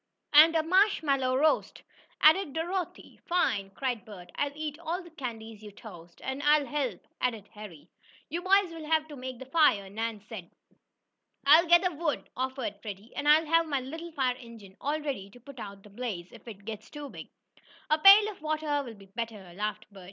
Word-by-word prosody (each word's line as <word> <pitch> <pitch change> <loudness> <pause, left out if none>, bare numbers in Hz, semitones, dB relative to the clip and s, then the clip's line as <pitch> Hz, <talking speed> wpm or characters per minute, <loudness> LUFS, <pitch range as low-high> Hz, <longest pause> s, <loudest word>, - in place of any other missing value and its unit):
"And 315 +3 +8
a 320 - +3
marshmallow 315 -8 +2
roast!" 310 +3 +1 0.4
added 315 -1 +5
Dorothy. 350 +3 -4
"Fine!" 230 - +1
cried 250 -5 -2
Bert. 200 -6 -12
"I'll 285 - -1
eat 305 0 -5
all 340 +2 -3
the 345 - -14
candies 225 -7 -7
you 210 - -9
toast!" 175 -5 -13
"And 265 +1 -4
I'll 295 0 +4
help!" 270 -10 -3 0.2
added 225 -5 -1
Harry. 185 -8 -11 0.4
"You 335 +4 -4
boys 375 -1 +3
will 320 -2 -8
have 315 -1 +2
to 295 - -8
make 255 -1 -7
the 260 - -9
fire," 255 -10 +3
Nan 225 +1 -3
said. 210 -5 -9 1.0
"I'll 315 +5 +7
gather 345 +1 +5
wood!" 310 -1 -2
offered 255 -5 -4
Freddie. 205 +1 -9
"And 290 +1 0
I'll 310 +2 +6
have 330 +1 +3
my 285 -3 0
little 320 +6 -7
fire 255 -4 0
engine 230 -6 -13
all 295 +2 -1
ready 270 -10 -4
to 245 - -16
put 260 +1 -13
out 200 -2 -9
the 210 - -16
blaze, 200 -6 -5
if - - -15
it 205 -3 -10
gets 220 -1 -7
too 295 -1 -8
big." - - -10 0.6
"A 305 - +4
pail 400 +5 +9
of 395 - -16
water 310 -1 -1
will 235 -4 -9
be 200 -1 -15
better," 200 -3 -7
laughed 210 +2 -4
Bert. 200 - -13
265 Hz, 190 wpm, -29 LUFS, 215-315 Hz, 1.0 s, pail